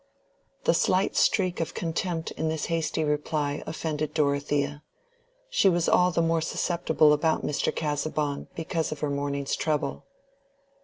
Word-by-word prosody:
The - - +4
slight 185 +2 +2
streak 185 -4 +2
of 165 - -3
contempt 165 0 -2
in 160 - -2
this 160 -1 -2
hasty 160 -1 0
reply 150 -1 -1
offended 155 -1 -3
Dorothea. 145 -1 0 0.7
She - - +3
was 175 -2 +1
all 180 0 +5
the 165 -1 +1
more 165 0 +2
susceptible 160 -2 +2
about 160 +2 +1
Mr. 150 - 0
Casaubon 150 -1 -2
because 165 0 -2
of 155 - -6
her 150 -2 0
morning's 140 -1 -1
trouble. 155 -2 -2
155 Hz, 140 wpm, -27 LUFS, 145-165 Hz, 0.7 s, all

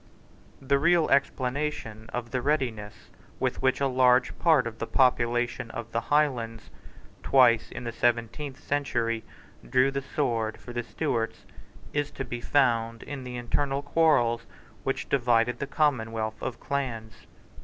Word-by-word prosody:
The 140 +1 +1
real 170 +1 +4
explanation 130 -5 -1
of 120 -1 -4
the 130 - -1
readiness 115 -8 -2 0.3
with - - -1
which 130 0 +2
a 140 - +2
large 125 -1 +3
part 155 -7 +4
of 115 -1 -6
the 115 - -3
population 120 -2 +1
of 115 0 -7
the 115 - 0
Highlands, 120 -6 0 0.5
twice 120 -4 +4
in - - -7
the 120 - -3
seventeenth 120 +4 -1
century, 120 -6 -1 0.5
drew 130 - +4
the 140 0 -2
sword 115 -6 -1
for 120 - -10
the 120 - -1
Stuarts 120 -2 -3 0.5
is 145 0 0
to 135 - -4
be 120 0 -5
found 115 -4 +1
in 140 -2 -6
the 125 -1 -6
internal 135 +3 -1
quarrels 135 -7 +2 0.4
which - - -2
divided 120 -2 +2
the 140 - -3
commonwealth 115 -7 0
of 120 - -4
clans. 115 -6 -4
125 Hz, 145 wpm, -27 LUFS, 115-140 Hz, 0.5 s, real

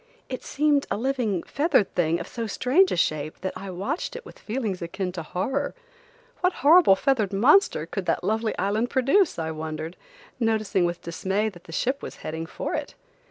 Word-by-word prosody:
It 255 - -5
seemed 290 -1 +1
a - - -1
living, 235 -7 0
feathered 285 - +1
thing 170 -1 +1
of 170 - -6
so 230 -2 -4
strange 275 - +3
a - - +1
shape 155 -3 -1
that 190 - -3
I 195 - -7
watched 190 - -3
it 485 - -8
with - - -13
feelings 215 -5 -3
akin 180 +2 -3
to 175 -2 -5
horror. 260 - -2 0.6
What 365 0 +2
horrible 320 - +8
feathered 220 -3 +1
monster 265 - +4
could - - -5
that - - +1
lovely 220 0 0
island 210 +5 0
produce, 275 +8 +3
I 160 -1 -2
wondered, 160 +1 -5 0.4
noticing 215 -5 +1
with 175 0 -3
dismay 195 +5 -1
that 175 -4 -15
the - - -11
ship 260 - -1
was - - -7
heading 160 +1 -4
for - - -4
it. - - -4
210 Hz, 185 wpm, -25 LUFS, 175-270 Hz, 0.6 s, horrible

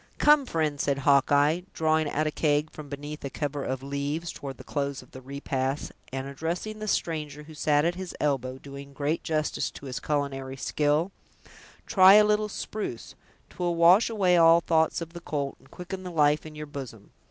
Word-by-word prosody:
"Come, 295 -3 +5
friend," 155 - -1
said 140 -1 0
Hawkeye, 145 +3 +3
drawing 155 -1 +2
out 155 +2 0
a 155 - 0
keg 150 0 +1
from 150 -2 -10
beneath 145 +2 -7
a 140 - -3
cover 145 0 -3
of 130 0 -3
leaves, 145 +4 -3
toward 135 -2 -8
the - - -11
close 140 -1 -3
of - - -22
the 130 - -10
repast, 135 +1 -3 0.2
and 135 0 -4
addressing 170 +10 -4
the 215 - -5
stranger 150 -6 -2
who 155 +1 -12
sat 150 0 +2
at 170 - +2
his 185 0 -7
elbow, 130 -3 -1
doing 140 0 -10
great 145 +3 -1
justice 155 -1 -1
to - - -12
his 130 -2 -4
culinary 135 -2 -2
skill, 150 +6 0 0.7
"try 190 -2 +7
a 210 - +8
little 210 0 +1
spruce; 205 - -5 0.4
'twill 175 -1 -1
wash 175 +7 +6
away 190 -5 +3
all 165 0 +7
thoughts 160 0 +1
of 165 0 -7
the 170 - -8
colt, 145 -4 -3
and - - -22
quicken 180 +1 -7
the 185 - -6
life 150 -2 +2
in 155 - -11
your 150 0 -6
bosom. 135 -8 -9
150 Hz, 190 wpm, -27 LUFS, 140-170 Hz, 0.7 s, a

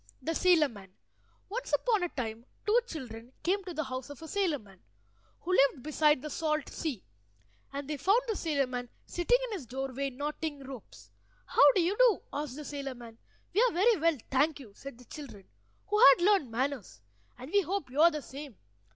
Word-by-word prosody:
THE 325 - -2
SAILOR 335 -4 +4
MAN 200 -5 -12 0.6
Once - - -5
upon 445 -5 +2
a 355 - 0
time 230 -5 -5 0.2
two 435 +3 +5
children 245 - -8
came 390 +3 +1
to 360 - -5
the 310 - -1
house 255 -1 -6
of 285 - -9
a - - -7
sailor 375 -5 0
man, 195 -6 -18 0.6
who 360 - -3
lived 275 -3 +3
beside 300 -2 +2
the 305 - -4
salt 305 -2 -1
sea; 280 - -4 0.7
and 280 0 -5
they 300 -1 -3
found 390 - +4
the 445 - -1
sailor 300 -6 0
man 245 -1 -5 0.2
sitting 355 +8 +2
in - - -9
his 350 - -5
doorway 270 +2 -3
knotting 290 +2 -4
ropes. 260 -5 -11 0.3
"How 285 0 +6
do 375 - +4
you 365 +4 +1
do?" 485 -4 +4
asked 290 -3 -3
the 300 0 -7
sailor 275 -2 -5
man. 230 -2 -12 0.3
"We 415 - +4
are - - +3
very 435 +7 +4
well, 330 -1 +2
thank 290 +3 +2
you," 225 -7 -12
said 275 -3 -9
the 250 - -16
children, 235 -8 -10 0.4
who 420 - 0
had 275 -3 +8
learned 390 - +4
manners, 250 - -3 0.3
"and 255 +5 -9
we 405 - +4
hope 375 -7 -3
you 285 +4 +1
are 335 - +9
the 300 -3 -5
same. 275 -5 -9
290 Hz, 200 wpm, -30 LUFS, 255-350 Hz, 0.7 s, are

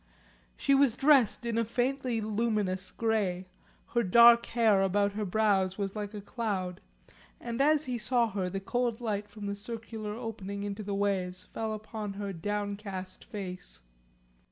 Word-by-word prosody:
She 275 - +2
was 275 -4 +4
dressed 270 -5 +4
in 230 -1 0
a - - +3
faintly 245 +1 -1
luminous 210 -4 -1
grey, 200 -5 0 0.4
her 235 - +2
dark 235 +3 +7
hair 220 -4 +3
about 200 +1 +2
her 210 +1 -3
brows 195 -2 +2
was 195 -1 -3
like 210 0 -5
a 205 - -5
cloud, 195 -5 -3 0.6
and 235 +2 -3
as 305 +1 +4
he 245 -2 -2
saw 235 0 +2
her 190 -2 -2
the 195 +2 -3
cold 240 +3 -1
light 210 -3 -3
from 205 0 -8
the 200 - -2
circular 215 0 -6
opening 205 -4 -5
into 205 +1 -4
the 200 -1 -3
ways 185 -2 0
fell 220 -1 -4
upon 215 -1 -5
her 200 0 -4
downcast 200 0 -4
face. 180 - -7
210 Hz, 155 wpm, -30 LUFS, 195-230 Hz, 0.6 s, dark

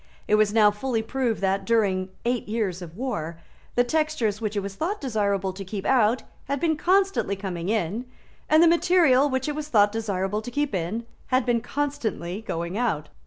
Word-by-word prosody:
It - - 0
was 210 -1 +4
now 210 -1 +5
fully 225 +2 -2
proved 240 -2 -1
that, 195 0 +1
during 195 -5 +1 0.2
eight 245 0 0
years 205 -5 -2
of 170 0 -9
war, 205 -11 -3 0.4
the 245 - +4
textures 245 -6 0
which 215 -1 -2
it 200 - 0
was 195 0 -5
thought 355 - -2
desirable 200 -7 -1
to 195 +1 -7
keep 195 +1 -6
out 245 -2 +3 0.2
had 280 0 -2
been 320 +1 +1
constantly 375 - +2
coming 185 -2 -4
in, 215 +2 -1 0.4
and 310 +2 +6
the - - +7
material 335 -5 +4
which 260 0 -1
it 300 - -1
was 300 0 -5
thought 205 -7 +4
desirable 205 -2 -2
to 245 - -7
keep 290 +1 -1
in 190 +6 -2 0.2
had 255 0 +2
been 240 -2 +1
constantly 235 -11 -3
going 170 -1 -3
out. 160 -12 -1
220 Hz, 190 wpm, -25 LUFS, 195-265 Hz, 0.4 s, the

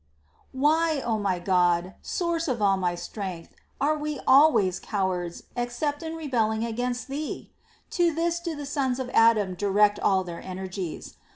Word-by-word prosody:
Why, 310 +3 +2
O 225 -4 -1
my 195 -3 0
God, 175 0 +2
source 340 -1 -1
of 250 -4 -1
all 200 -2 +3
my 180 -2 -1
strength, 175 -1 -6 0.3
are 300 +2 +2
we 300 -1 -4
always 250 - +5
cowards, 185 -4 -2
except 245 +5 -2
in 325 0 -5
rebelling 230 -8 0
against 245 +2 -3
Thee? 290 +3 -5 0.4
To 345 -2 +2
this 335 +2 0
do 340 -2 -4
the 290 -1 -6
sons 275 -3 -1
of 255 -1 -4
Adam 220 -4 +4
direct 205 +2 +2
all 190 -1 +2
their 175 -2 -7
energies. 185 -2 -6
230 Hz, 155 wpm, -26 LUFS, 190-295 Hz, 0.4 s, always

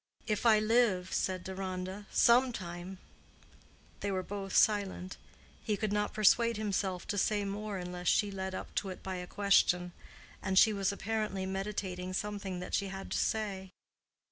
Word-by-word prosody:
"If 215 +2 0
I 220 -2 +7
live," 215 -4 +2
said 185 -1 -1
Deronda—"some 195 +6 +1
time." 175 -1 -6 1.0
They 205 - -2
were 190 -1 -1
both 195 0 -5
silent. 200 -3 +2 0.5
He 210 -3 0
could 210 0 -1
not 210 0 0
persuade 230 +2 +4
himself 195 -4 -1
to 205 - -1
say 205 0 +1
more 205 +1 -4
unless 180 -1 -5
she 205 +3 +3
led 190 -1 -4
up - - -7
to 195 - -7
it 185 - -8
by 190 -1 -4
a 180 0 -6
question; 180 -3 +3 0.5
and 190 0 -1
she 215 +2 +7
was 195 -1 0
apparently 210 -2 -2
meditating 190 -1 -3
something 200 -2 -3
that 180 - -7
she 200 - +1
had 195 0 -7
to - - 0
say. 200 -4 -1
195 Hz, 160 wpm, -32 LUFS, 185-210 Hz, 1.0 s, I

